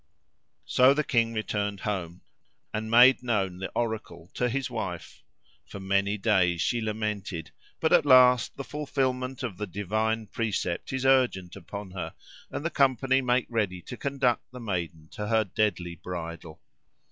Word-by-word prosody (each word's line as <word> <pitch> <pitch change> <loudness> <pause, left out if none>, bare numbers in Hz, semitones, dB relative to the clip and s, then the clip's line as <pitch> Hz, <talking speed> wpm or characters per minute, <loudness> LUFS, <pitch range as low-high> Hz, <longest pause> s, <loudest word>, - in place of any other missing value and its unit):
So 130 +2 +5
the 150 - +1
king 115 -4 +1
returned 105 -2 -2
home 90 -4 -4 0.5
and 110 0 -3
made 125 +3 +7
known 100 -7 -1
the 95 - -4
oracle 105 -7 -4
to 125 - 0
his 135 +1 -1
wife. 105 -8 -6 0.5
For 100 - -8
many 100 +2 +1
days 95 -5 +2
she 120 +6 0
lamented, 105 -7 -3 0.3
but - - +2
at - - +6
last 125 -3 +5
the 140 - -4
fulfilment 130 -3 -2
of 110 -8 -4
the 105 - -4
divine 110 +4 -1
precept 105 -6 -2
is 130 0 -2
urgent 125 -10 +2
upon 100 +1 -8
her, 90 0 -6 0.3
and 145 - -5
the 170 - 0
company 135 -1 +3
make 125 0 +1
ready 105 -6 -1
to - - -7
conduct 135 -3 -1
the 125 - -9
maiden 85 -8 -4
to 105 - -5
her 110 0 +3
deadly 90 -4 -1
bridal. 85 -2 -7
110 Hz, 155 wpm, -27 LUFS, 95-125 Hz, 0.5 s, made